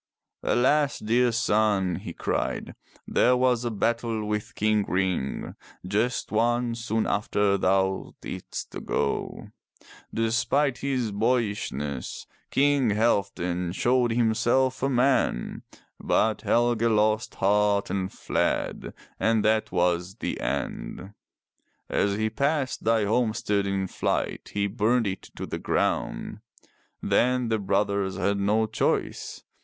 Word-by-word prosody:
Alas, 145 +3 +2
dear 120 +3 +2
son!'' 105 -5 +1
he - - -7
cried. - - -2 0.3
There 125 0 +3
was 125 -1 +2
a 120 - -1
battle 115 0 -1
with 105 0 -3
King 105 -1 +2
Ring, 90 -7 -1 0.3
just 110 +6 -1
one, 120 +2 +1
soon 115 -1 -1
after 100 -1 +1
thou 95 0 0
didst 90 - -7
go. 70 - -2 0.6
Despite 115 +5 +1
his 130 -5 -1
boyishness. 100 - -2 0.2
King 140 -3 +3
Halfdan 90 -5 0
showed 120 +3 +2
himself 120 +3 +2
a 135 - +1
man, 125 - +1 0.4
but 110 -1 +1
Helge 120 -1 +2
lost 110 -1 +2
heart 100 +1 +2
and 95 -1 -2
fled, - - -2 0.2
and 110 -1 +2
that 110 0 +2
was 90 0 0
the - - -4
end. 95 +3 -4 0.8
As 100 0 +1
he 110 +1 -1
passed 140 0 -1
thy 110 -2 +3
homestead 110 -2 +1
in 95 -1 -1
flight - - -2
he 100 0 +1
burned 115 +3 +1
it 95 -1 -3
to - - -5
the - - -5
ground. - - -1 0.6
Then 125 -1 +2
the 110 -1 +1
brothers 100 -1 0
had 100 0 0
no 105 +3 +2
choice. 110 0 -2
110 Hz, 115 wpm, -26 LUFS, 100-120 Hz, 0.8 s, There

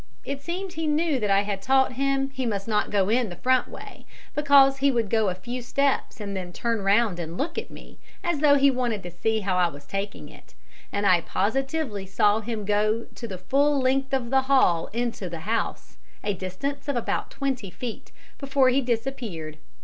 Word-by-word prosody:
It 280 0 -4
seemed 355 +4 -4
he 325 -2 -2
knew 300 -2 +1
that 210 -3 -1
I 195 0 +4
had 200 -1 -3
taught 265 +4 +3
him 270 +1 0
he 265 -2 -3
must 200 -2 -2
not 210 -2 +1
go 195 -2 +2
in 235 0 +2
the 175 - -7
front 255 +4 +2
way, - - -11 0.3
because 280 -2 +5
he 280 +1 +3
would 235 -6 0
go 220 -3 +3
a 180 - -3
few 240 +7 -6
steps 275 +1 0
and 200 -2 -5
then 180 -2 -5
turn 230 +3 -1
round 200 -1 +2
and 165 +1 -5
look 320 +4 -2
at - - -8
me, - - -13 0.2
as 345 -4 0
though 290 -1 +6
he 280 0 +5
wanted 240 -5 -1
to 175 - -7
see 220 +6 0
how 190 -2 0
I 180 -1 +4
was 145 -3 -10
taking 195 -4 -4
it, - - -17 0.4
and 205 0 -1
I 180 -3 +5
positively 235 - -1
saw 205 +2 +3
him 220 -1 -4
go 215 +2 +1
to 235 - -7
the 190 -4 -6
full 280 +10 +2
length 270 +1 +1
of 260 -3 -1
the 265 0 +4
hall 260 -11 +3
into 230 -5 -3
the 165 -1 -6
house, 225 +6 -3 0.3
a 205 - 0
distance 195 +11 -5
of 285 - -1
about 240 - -1
twenty 265 -8 -3
feet, 235 +4 -7 0.3
before 270 -2 +3
he 265 +2 +3
disappeared. 225 - -3
235 Hz, 205 wpm, -25 LUFS, 200-270 Hz, 0.4 s, though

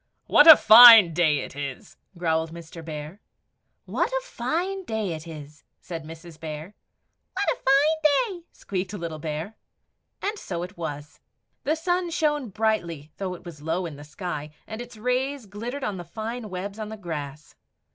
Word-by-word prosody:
"WHAT 295 - +6
A 315 -3 +13
FINE 220 -5 +10
DAY 155 -4 +2
IT - - -9
IS!" 140 -2 -7 0.2
growled 160 -1 0
Mr. 165 0 -10
Bear. 155 +4 -8 0.6
"WHAT - - -1
A - - -2
FINE 365 - -3
DAY 220 - -3
IT 160 +1 -8
IS!" 150 -2 -11 0.2
said 165 -3 -7
Mrs. 165 0 -12
Bear. 155 +3 -7 0.6
"What 390 +2 -1
a - - -3
fine 310 - +2
day!" 340 - -25
squeaked 190 0 -5
little 170 -5 -5
Bear. 155 +6 -5 0.7
And 415 +1 -3
so 175 -2 -5
it 180 +3 -8
was. 145 -3 -7 0.5
The 310 - +2
sun 355 +2 -1
shone 295 -6 0
brightly 170 -8 -2
though 185 -2 -4
it 180 - -15
was 160 -4 -10
low 165 +4 -2
in 160 -4 -7
the 145 - -11
sky, 150 -1 -6 0.2
and 220 +1 -7
its 245 -2 -11
rays 250 +3 -1
glittered 235 +7 -6
on 205 -5 -3
the 175 - -6
fine 220 +5 -6
webs 195 +3 -6
on 215 -1 -5
the 220 - -7
grass. 150 -6 -7
190 Hz, 170 wpm, -25 LUFS, 160-250 Hz, 0.7 s, A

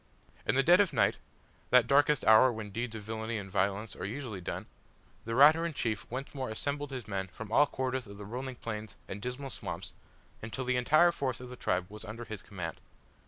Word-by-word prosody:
In - - +2
the 135 - +4
dead 175 +5 +7
of 200 - +1
night - - +3 0.5
that 125 -1 +6
darkest 145 +2 +4
hour 110 +4 +7
when 110 -3 -6
deeds 115 +2 -3
of 110 - -6
villainy 110 +1 -3
and 95 -2 -7
violence 100 +3 0
are - - -7
usually 110 -3 -4
done - - -4 0.6
the 115 - -3
Raturan 155 +4 +6
chief 110 -5 -2
once 130 +3 -5
more 130 -3 -3
assembled 145 +6 -3
his 130 -5 -6
men 95 -2 -2
from 105 +4 -9
all 145 +5 +5
quarters 130 -3 -2
of 100 0 -10
the 105 - -8
rolling 125 +4 -5
plains 110 -3 -6
and 100 - -6
the 125 - -2
dismal 135 +2 -6
swamps, - - -6 0.5
until 115 +4 -4
the 130 0 +1
entire 155 +8 +5
force 130 -7 -2
of 125 0 -9
the 125 - -8
tribe 90 -6 0
was 105 +2 -10
under 110 +2 -7
his 110 -4 -7
command. 90 -5 -6
120 Hz, 210 wpm, -31 LUFS, 105-135 Hz, 0.6 s, dead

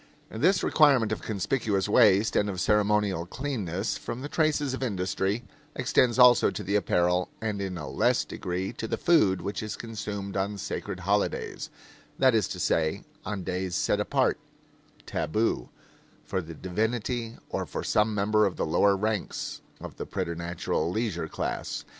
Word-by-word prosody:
This 170 - +2
requirement 135 -8 +4
of 110 - -2
conspicuous 105 -1 -1
waste 105 -1 +4
and 105 - +2
of 95 -2 -4
ceremonial 105 -4 +2
cleanness 105 - -3
from 115 +2 -5
the - - -3
traces 150 -4 +1
of 130 - -4
industry 100 -1 -1 0.3
extends 120 -2 +2
also 125 -1 +7
to - - -5
the 100 - -1
apparel, 90 -2 +2
and 105 -2 -2
in 95 -2 -3
a 75 -4 -6
less 65 - +2
degree 90 +1 -4
to 110 - -5
the - - -2
food, 100 - +3
which 100 +2 -3
is 110 -1 -4
consumed 105 -3 -5
on 100 +1 -1
sacred 95 -1 -5
holidays; 100 +3 -1 0.5
that 130 -2 +5
is 110 -5 +2
to - - -6
say, 80 -1 +1 0.2
on 105 -3 -3
days 90 0 -2
set - - +1
apart - - +1 0.7
tabu 110 +8 -1 0.6
for 95 - -2
the 80 -1 -9
divinity 115 +6 -2
or - - -3
for - - -4
some 105 0 +2
member 105 +1 +3
of 95 - -4
the - - -1
lower 100 +5 +3
ranks 105 -1 -2 0.2
of - - -9
the - - -5
preternatural 85 -1 -2
leisure 90 -5 -2
class. - - -4
105 Hz, 160 wpm, -27 LUFS, 95-115 Hz, 0.7 s, also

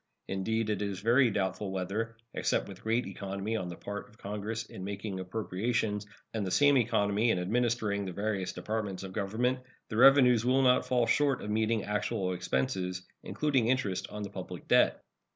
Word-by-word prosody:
Indeed, 110 +3 -1
it 105 - -1
is 100 -3 -2
very 120 +5 +4
doubtful 100 0 -1
whether, 100 +5 -3 0.2
except - - 0
with - - -10
great 115 +3 +1
economy 100 +2 -4
on 95 -5 -2
the 85 - -6
part 100 +3 -6
of 110 - -22
Congress 105 +3 -4
in 95 - -9
making 100 0 -4
appropriations 105 +2 -2 0.3
and 110 -2 -1
the 95 - -2
same 145 +8 +5
economy 110 -2 +2
in 115 - +3
administering 105 +1 0
the 95 - -4
various 100 0 -2
Departments 105 -4 -3
of 95 -1 -7
Government, 115 +6 0 0.3
the 110 - -3
revenues 125 -3 +7
will 130 +2 +3
not 125 -1 +4
fall 125 -2 +3
short 140 +2 +2
of 105 - -3
meeting 110 0 +1
actual 100 -3 -1
expenses, 90 +2 -1 0.2
including 135 -6 0
interest 120 -7 0
on 105 0 -6
the 100 - -6
public 90 -2 -7
debt. - - +4
105 Hz, 175 wpm, -30 LUFS, 95-115 Hz, 0.3 s, revenues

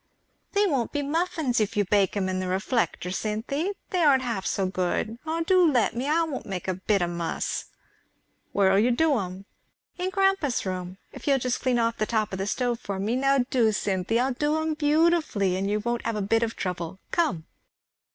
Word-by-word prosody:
"They 410 0 +3
won't 275 - 0
be 290 -1 -1
muffins 315 -4 0
if 215 0 -1
you 205 - +3
bake 200 +1 +2
'em 190 -2 0
in 185 0 -1
the 185 - -2
reflector, 190 -1 -1
Cynthy; 235 - -2 0.2
they 365 - 0
aren't 275 -4 +5
half 230 -6 -2
so 195 - 0
good. 185 +5 -2
Ah, 325 +1 -1
do 355 -1 +4
let 240 -4 +2
me 250 +4 -2
I 315 +3 +3
I - - +3
won't 305 -5 -5
make 190 -3 -5
a 185 - +1
bit 190 +1 0
of 175 - -1
muss." 170 -1 -3 0.9
"Where'll 195 -1 +4
you 230 +4 +3
do 295 +4 +3
'em?" 185 0 -6 0.5
"In 365 +1 0
grandpa's 385 - +1
room 185 0 -4 0.2
if - - -10
you'll 275 -1 +4
just 250 -1 -1
clean 255 -2 +1
off 230 0 0
the 215 - 0
top 215 -2 0
of 190 - -3
the 195 - -2
stove 240 +1 -1
for 200 -5 -4
me 210 +5 -1
now 275 -1 +2
do, 235 -5 +3
Cynthy! 195 +2 0
I'll 260 +1 +1
do 295 +4 0
'em 315 0 -1
beautifully 305 - +2
and 195 +2 -1
you 210 +1 +1
won't 235 +2 -2
have 230 -1 -2
a 210 - -1
bit 225 +3 +2
of 230 -1 -1
trouble. 180 -1 -4
Come!" 195 - 0
230 Hz, 210 wpm, -26 LUFS, 195-290 Hz, 0.9 s, aren't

